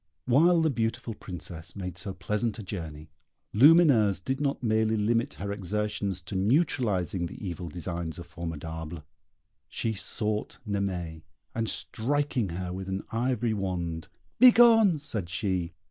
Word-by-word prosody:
While 165 +7 +4
the 160 - +3
beautiful 115 -1 -2
Princess 85 -4 -7
made 90 -3 -5
so 95 +1 -4
pleasant 105 +4 -2
a 110 - -6
journey, 80 -5 -7 0.4
Lumineuse 130 - +6
did 130 +8 -3
not 140 -2 -1
merely 110 -1 +2
limit 115 +6 +1
her 100 +1 -4
exertions 100 -1 -2
to 90 - -7
neutralizing 100 - +1
the - - -10
evil 90 -3 -5
designs 85 0 -4
of 85 - -8
Formidable; 80 -1 -6 0.7
she 115 - -2
sought 105 +1 -2
Naimée, 90 -6 -2 0.3
and 115 -1 -1
striking 135 -2 -1
her 90 +1 -4
with 95 0 -5
an 95 +1 -3
ivory 120 -1 0
wand 90 -5 -3 0.3
"Begone!" 230 -7 +7
said 110 - -4
she. 90 -1 -1
100 Hz, 135 wpm, -28 LUFS, 90-120 Hz, 0.7 s, Begone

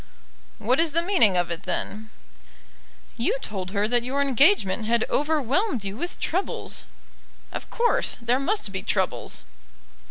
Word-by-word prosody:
"What 245 +6 +1
is 325 -3 +2
the 335 +1 +2
meaning 335 - +5
of 175 -1 0
it, 170 +1 -3
then?" 215 +2 -3 1.1
"You 240 +3 0
told 190 -6 -4
her 205 +1 0
that 240 +1 +2
your 260 +4 -2
engagement 275 - +3
had 235 +1 +2
overwhelmed 295 - +1
you 195 0 -4
with 345 +9 -5
troubles." 370 +4 -2 0.7
"Of - - -7
course; 475 0 +1
there 240 +2 +1
must 330 - -1
be 190 - -3
troubles." - - -1
245 Hz, 145 wpm, -25 LUFS, 210-320 Hz, 1.1 s, meaning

